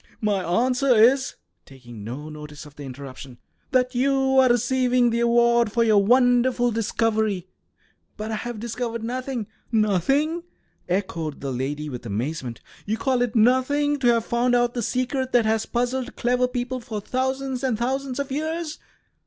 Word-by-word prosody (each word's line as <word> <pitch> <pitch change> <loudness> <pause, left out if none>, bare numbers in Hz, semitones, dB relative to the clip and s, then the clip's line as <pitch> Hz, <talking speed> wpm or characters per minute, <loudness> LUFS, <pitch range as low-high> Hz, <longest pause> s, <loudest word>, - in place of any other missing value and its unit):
"My 205 -3 0 0.2
answer 255 0 +2
is," 260 +5 +4 0.3
taking 120 -5 -12
no 130 +8 -6
notice 150 -1 -9
of 150 -1 -15
the - - -11
interruption, 135 -1 -9 0.3
"that 255 -1 +1
you 265 +1 +2
are 260 -1 +5
receiving 245 0 +2
the 230 - 0
award 235 -1 +3
for 235 +2 +2
your 215 -3 +4
wonderful 245 +1 +3
discovery." 220 -3 0 0.7
"But 215 0 -4
I - - -1
have 240 0 -5
discovered 230 0 -4
nothing." 250 -1 -3 0.3
"Nothing!" 245 - +1 0.5
echoed 170 -5 -2
the 135 -1 -4
lady, 140 +4 -3
with 125 -4 -7
amazement. 120 +3 -4 0.3
"You 220 +2 0
call 260 -1 0
it 245 -2 -1
nothing 260 +5 +3
to 255 - +1
have 230 -1 +3
found 245 +1 +1
out 240 0 +2
the 240 - -2
secret 255 +3 -1
that 240 -2 +4
has 220 0 +1
puzzled 250 +1 -2
clever 250 +1 +1
people 250 0 -3
for 230 -3 -5
thousands 260 +3 -2
and 255 -5 +1
thousands 260 +2 -2
of 280 -1 -3
years? 315 +2 -3
240 Hz, 160 wpm, -24 LUFS, 205-255 Hz, 0.7 s, are